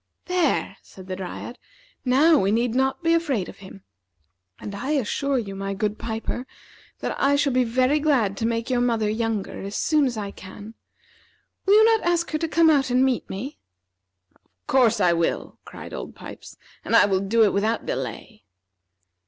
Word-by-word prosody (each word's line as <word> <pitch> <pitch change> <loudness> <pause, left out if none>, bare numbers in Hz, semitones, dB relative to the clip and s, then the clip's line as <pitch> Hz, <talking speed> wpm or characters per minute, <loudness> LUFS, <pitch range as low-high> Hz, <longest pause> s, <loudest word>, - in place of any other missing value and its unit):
"There," 360 -1 0
said 190 - -14
the 185 0 -5
Dryad; 190 +6 -7 0.4
"now 285 +5 +4
we 195 +1 +1
need 230 +1 +1
not 265 +5 0
be 330 0 +3
afraid 285 - 0
of - - -12
him. 195 0 -13 0.8
And 205 - -7
I 260 +9 -3
assure 275 +1 0
you, 205 -5 -4
my 195 0 -4
good 210 +1 -2
piper, 230 +3 -4 0.5
that - - -2
I 280 +1 +4
shall 285 -2 +1
be 255 0 +3
very 255 +5 +2
glad 260 -10 +1
to 225 - 0
make 230 +2 -2
your 245 -1 +2
mother 230 -3 +1
younger 220 -1 -2
as 200 +1 -6
soon 305 -3 +2
as 240 -3 -4
I 200 -2 -4
can. 205 +4 -11 0.9
Will 400 - +6
you 435 +1 +7
not 450 -1 +3
ask 340 -1 +1
her 310 - -1
to 330 - -1
come 320 0 +4
out 275 -3 +2
and 250 +2 +3
meet 260 -2 -1
me?" 245 +10 -6 0.7
"Of - - -35 0.2
course 235 -4 +3
I 175 -3 +4
will," 170 -1 -2
cried - - -10
Old - - -7
Pipes; - - -11 0.3
"and - - 0
I - - +7
will 195 -2 +1
do 215 +4 +2
it 205 - +3
without 215 +3 0
delay." 120 -4 -5
235 Hz, 185 wpm, -24 LUFS, 200-280 Hz, 0.9 s, you